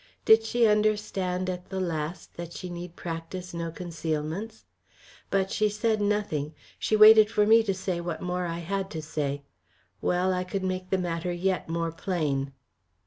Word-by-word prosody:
Did 220 Hz, 0 st, +7 dB
she 235 Hz, +1 st, +2 dB
understand 210 Hz, -4 st, +1 dB
at 180 Hz, 0 st, -5 dB
the 190 Hz, -, -3 dB
last 165 Hz, -1 st, -3 dB
that 170 Hz, 0 st, -7 dB
she 180 Hz, -, -6 dB
need 175 Hz, 0 st, -7 dB
practise 175 Hz, +2 st, -6 dB
no 170 Hz, -1 st, -3 dB
concealments? 165 Hz, +5 st, -4 dB, 0.6 s
But 195 Hz, -1 st, +1 dB
she 215 Hz, -1 st, +2 dB
said 215 Hz, +1 st, 0 dB
nothing, 200 Hz, -8 st, -1 dB, 0.2 s
she 215 Hz, -, +1 dB
waited 215 Hz, 0 st, +9 dB
for 210 Hz, -2 st, +2 dB
me 225 Hz, +2 st, +7 dB
to 200 Hz, -4 st, -1 dB
say 185 Hz, -2 st, -2 dB
what 170 Hz, -2 st, -4 dB
more 180 Hz, 0 st, -2 dB
I 165 Hz, 0 st, -3 dB
had 195 Hz, +1 st, -2 dB
to -, -, -3 dB
say. 145 Hz, -2 st, -3 dB, 0.6 s
Well, 180 Hz, +1 st, +1 dB
I 180 Hz, 0 st, -1 dB
could 190 Hz, +1 st, -4 dB
make 185 Hz, 0 st, -3 dB
the 190 Hz, -, +2 dB
matter 175 Hz, -1 st, -2 dB
yet 180 Hz, 0 st, -1 dB
more 165 Hz, 0 st, -1 dB
plain. 150 Hz, -6 st, -1 dB
180 Hz, 170 wpm, -27 LUFS, 165-205 Hz, 0.6 s, waited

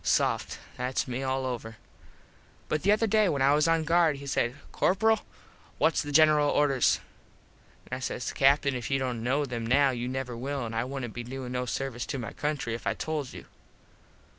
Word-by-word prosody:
Soft. -, -, +1 dB, 0.2 s
Thats 125 Hz, +2 st, -1 dB
me 125 Hz, +1 st, -3 dB
all 130 Hz, 0 st, -1 dB
over. 115 Hz, -3 st, -5 dB, 0.9 s
But 155 Hz, -, 0 dB
the 200 Hz, -, +3 dB
other 215 Hz, +2 st, +3 dB
day 215 Hz, -2 st, +3 dB
when 140 Hz, -4 st, 0 dB
I 140 Hz, +1 st, +5 dB
was 150 Hz, +2 st, +3 dB
on 165 Hz, -1 st, +2 dB
guard 165 Hz, -1 st, +3 dB
he 140 Hz, 0 st, -9 dB
says, 120 Hz, -3 st, 0 dB, 0.2 s
"Corperal, 220 Hz, +4 st, +2 dB, 0.6 s
whats 160 Hz, -, +2 dB
the 145 Hz, -, -5 dB
General 150 Hz, -1 st, +5 dB
orders?" 140 Hz, -4 st, +3 dB, 0.9 s
an 130 Hz, -, -4 dB
I -, -, -8 dB
says, 125 Hz, -1 st, -3 dB
"Captin 140 Hz, 0 st, +3 dB
if 125 Hz, -2 st, -4 dB
you 135 Hz, -, +2 dB
dont 125 Hz, -3 st, -2 dB
kno 135 Hz, +5 st, +1 dB
them 120 Hz, -3 st, -4 dB
now 135 Hz, +4 st, +4 dB
you 120 Hz, -1 st, -3 dB
never 130 Hz, -1 st, -4 dB
will 135 Hz, +2 st, -3 dB
and 115 Hz, 0 st, -5 dB
I 115 Hz, -, 0 dB
wouldnt 130 Hz, -4 st, -5 dB
be 120 Hz, -, -5 dB
doin 130 Hz, +1 st, -6 dB
no 125 Hz, 0 st, -2 dB
service 130 Hz, -1 st, -3 dB
to -, -, -3 dB
my 120 Hz, -3 st, -5 dB
country 145 Hz, -6 st, -2 dB
if 115 Hz, -, -5 dB
I -, -, +1 dB
told 150 Hz, -4 st, -3 dB
you." -, -, -10 dB
135 Hz, 200 wpm, -28 LUFS, 125-150 Hz, 0.9 s, I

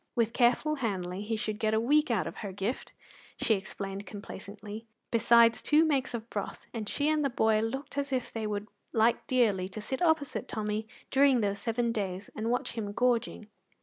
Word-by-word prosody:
With 230 Hz, -1 st, +1 dB
careful 255 Hz, +6 st, +3 dB
handling 190 Hz, -6 st, -2 dB
he 220 Hz, +2 st, -2 dB
should 215 Hz, -1 st, -3 dB
get 220 Hz, -1 st, +1 dB
a -, -, +3 dB
week 295 Hz, +6 st, +3 dB
out 225 Hz, -5 st, +1 dB
of 165 Hz, -, -6 dB
her 200 Hz, -3 st, -5 dB
gift, 200 Hz, +6 st, -3 dB, 0.5 s
she 225 Hz, -, +3 dB
explained 195 Hz, 0 st, -4 dB
complacently, 205 Hz, +2 st, -8 dB, 0.2 s
besides 230 Hz, 0 st, +5 dB
two 305 Hz, +2 st, +5 dB
makes 270 Hz, -5 st, 0 dB
of 230 Hz, -1 st, -6 dB
broth; 205 Hz, -, -4 dB
and 220 Hz, -3 st, -4 dB
she 290 Hz, -, 0 dB
and 310 Hz, -1 st, +2 dB
the 275 Hz, -, +2 dB
boy 220 Hz, -3 st, +2 dB
looked 265 Hz, +6 st, -3 dB
as 280 Hz, 0 st, -3 dB
if 255 Hz, -2 st, -1 dB
they 220 Hz, -1 st, -2 dB
would 205 Hz, 0 st, -3 dB, 0.3 s
like 230 Hz, +1 st, +2 dB
dearly 210 Hz, -8 st, +2 dB
to 205 Hz, -, -7 dB
sit 260 Hz, +7 st, -4 dB
opposite 320 Hz, -5 st, +1 dB
Tommy 215 Hz, 0 st, -2 dB, 0.2 s
during 270 Hz, -2 st, +5 dB
those 200 Hz, -1 st, 0 dB
seven 235 Hz, 0 st, 0 dB
days 195 Hz, -3 st, -3 dB
and 220 Hz, +1 st, -2 dB
watch 250 Hz, +2 st, 0 dB
him 210 Hz, -3 st, -4 dB
gorging. 240 Hz, -2 st, +1 dB
225 Hz, 190 wpm, -30 LUFS, 210-255 Hz, 0.5 s, besides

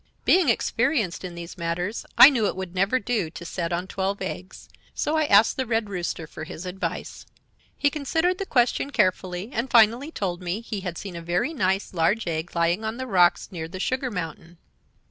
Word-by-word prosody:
Being 360 Hz, -6 st, +5 dB
experienced 230 Hz, -, 0 dB
in 180 Hz, -2 st, -6 dB
these 170 Hz, +2 st, -9 dB
matters 175 Hz, +5 st, -3 dB
I 290 Hz, -, +11 dB
knew 230 Hz, -6 st, +1 dB
it -, -, -2 dB
would 190 Hz, -2 st, -6 dB
never 195 Hz, +7 st, +2 dB
do 215 Hz, -7 st, -1 dB
to 170 Hz, +1 st, -10 dB
set 170 Hz, 0 st, -3 dB
on 175 Hz, +1 st, -1 dB
twelve 195 Hz, +1 st, -2 dB
eggs, 185 Hz, 0 st, -7 dB, 0.3 s
so 300 Hz, -, 0 dB
I 310 Hz, -1 st, +2 dB
asked 210 Hz, -4 st, +5 dB
the 260 Hz, -, 0 dB
Red 225 Hz, -2 st, 0 dB
Rooster 175 Hz, -3 st, -3 dB
for 155 Hz, -, -9 dB
his 160 Hz, +2 st, -8 dB
advice. 185 Hz, +2 st, -5 dB, 0.5 s
"He 285 Hz, -, +2 dB
considered 320 Hz, +5 st, 0 dB
the 390 Hz, -, -3 dB
question 250 Hz, +2 st, +2 dB
carefully, 185 Hz, -3 st, 0 dB
and 240 Hz, +3 st, -2 dB
finally 235 Hz, +5 st, +4 dB
told 185 Hz, -, -3 dB
me 180 Hz, +5 st, -3 dB
he 220 Hz, -3 st, -5 dB
had 180 Hz, -3 st, -5 dB
seen 195 Hz, -3 st, -7 dB
a 170 Hz, -, -6 dB
very 180 Hz, -, -1 dB
nice, 190 Hz, -7 st, 0 dB
large 185 Hz, +6 st, +1 dB
egg 165 Hz, 0 st, -3 dB
lying 170 Hz, +5 st, +1 dB
on 220 Hz, +1 st, -3 dB
the 260 Hz, -, -4 dB
rocks 180 Hz, -7 st, +3 dB
near 160 Hz, -3 st, -5 dB
the 185 Hz, +3 st, -8 dB
sugar 255 Hz, +5 st, -1 dB
mountain. 170 Hz, -3 st, -6 dB
195 Hz, 200 wpm, -25 LUFS, 175-240 Hz, 0.5 s, I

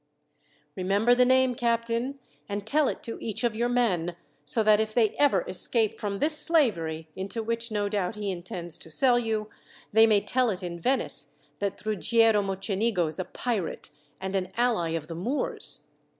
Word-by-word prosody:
"Remember 200 Hz, +6 st, +2 dB
the 250 Hz, 0 st, +4 dB
name, 260 Hz, 0 st, +4 dB
captain, 235 Hz, +2 st, -1 dB, 0.3 s
and 200 Hz, 0 st, -4 dB
tell 295 Hz, +5 st, +2 dB
it -, -, -4 dB
to 230 Hz, -, -6 dB
each 220 Hz, 0 st, -3 dB
of 235 Hz, -2 st, +1 dB
your 240 Hz, +2 st, 0 dB
men, 185 Hz, -9 st, 0 dB, 0.3 s
so 150 Hz, +10 st, +5 dB
that 215 Hz, 0 st, +5 dB
if 220 Hz, 0 st, -2 dB
they 225 Hz, -4 st, +3 dB
ever 275 Hz, -11 st, +4 dB
escape 215 Hz, +4 st, 0 dB
from 200 Hz, -1 st, -3 dB
this 305 Hz, +7 st, +1 dB
slavery, 170 Hz, -, +1 dB
into 200 Hz, +4 st, -4 dB
which, 230 Hz, +1 st, -3 dB
no 205 Hz, -2 st, -1 dB
doubt, 200 Hz, -1 st, -2 dB
he 205 Hz, -2 st, -3 dB
intends 175 Hz, -1 st, -4 dB
to -, -, -10 dB
sell 245 Hz, -, +3 dB
you, 220 Hz, -2 st, -2 dB, 0.4 s
they 220 Hz, +1 st, +7 dB
may 210 Hz, -2 st, +4 dB
tell 255 Hz, +4 st, +1 dB
it 190 Hz, -2 st, -4 dB
in 170 Hz, -1 st, -5 dB
Venice 260 Hz, +10 st, +1 dB, 0.2 s
that 200 Hz, 0 st, -3 dB
Ruggiero 220 Hz, 0 st, +3 dB
Mocenigo 195 Hz, 0 st, 0 dB
is 155 Hz, +2 st, -4 dB
a 185 Hz, -, -2 dB
pirate, 205 Hz, -2 st, -4 dB, 0.3 s
and 190 Hz, +1 st, -4 dB
an 185 Hz, -1 st, -2 dB
ally 225 Hz, -9 st, +1 dB
of 165 Hz, -2 st, -3 dB
the 165 Hz, -, -7 dB
Moors. 235 Hz, -, -2 dB
215 Hz, 180 wpm, -27 LUFS, 185-235 Hz, 0.4 s, they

